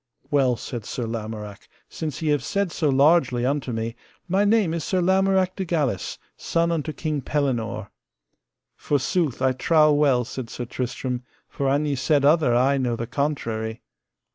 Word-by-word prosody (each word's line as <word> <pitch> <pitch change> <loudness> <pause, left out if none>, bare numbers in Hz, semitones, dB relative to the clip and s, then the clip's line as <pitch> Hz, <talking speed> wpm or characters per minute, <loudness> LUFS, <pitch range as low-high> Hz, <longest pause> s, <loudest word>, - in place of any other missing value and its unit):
Well, 135 -4 +3
said 120 0 -6
Sir 120 - -4
Lamorak, 110 -2 -6 0.2
since 155 -1 -5
ye 155 - +1
have 145 -4 +1
said 200 +2 -1
so 155 -1 0
largely 135 -3 +3
unto 135 -1 -1
me, 115 0 -3 0.3
my 190 +3 +2
name 205 -5 +3
is 165 -2 -2
Sir 185 - 0
Lamorak 190 0 +2
de 195 - -2
Galis, 150 - -1 0.2
son 170 0 0
unto 160 -2 -1
King 155 -2 -3
Pellinore. 130 -6 -2 0.8
Forsooth, 145 -1 0
I 130 - +4
trow 155 +4 +4
well, 140 -5 +3
said 120 0 -6
Sir 120 - -5
Tristram, 125 +1 -3 0.3
for 140 -1 -2
an 145 +2 +2
ye 145 - 0
said 140 +2 +2
other 150 -5 +4
I 135 +3 +3
know 125 -2 0
the 115 - -4
contrary. 115 -4 -3
140 Hz, 165 wpm, -24 LUFS, 125-160 Hz, 0.8 s, I